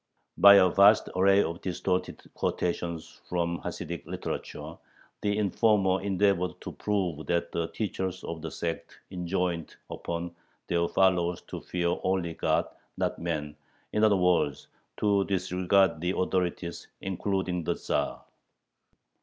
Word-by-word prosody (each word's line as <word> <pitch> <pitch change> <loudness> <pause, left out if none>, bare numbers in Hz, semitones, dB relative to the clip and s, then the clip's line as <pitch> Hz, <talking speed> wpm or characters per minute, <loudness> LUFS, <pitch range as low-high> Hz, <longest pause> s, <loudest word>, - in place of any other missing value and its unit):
By 100 +2 +9
a 95 -2 +7
vast 100 +4 +5
array 100 +2 +5
of 85 +3 -4
distorted 90 0 -2
quotations 85 -2 -3
from 85 -1 -1
Hasidic - - -5
literature - - -5 0.5
the 105 0 0
informer 100 -2 +2
endeavored 95 -2 +1
to - - -6
prove 90 -7 -2
that 85 0 0
the 85 -1 -1
teachers 95 -3 -3
of 85 -1 -5
the 80 - -4
sect 85 +1 -5
enjoined 90 -2 -2 0.2
upon 85 0 -4 0.3
their 85 0 +1
followers 90 -2 +2
to - - -6
fear 85 -1 -1
only 95 -3 0
God - - +1
and - - -19 0.2
not - - -1
men, 75 -3 -3 0.4
in 105 - +2
other 105 -2 +5
words, 90 -6 +1 0.3
to 100 -2 +2
disregard 95 -1 +2
the 90 +2 0
authorities, 90 -2 -1
including 95 -2 -2
the 85 +1 0
Tzar. - - -2
90 Hz, 130 wpm, -28 LUFS, 85-95 Hz, 0.5 s, By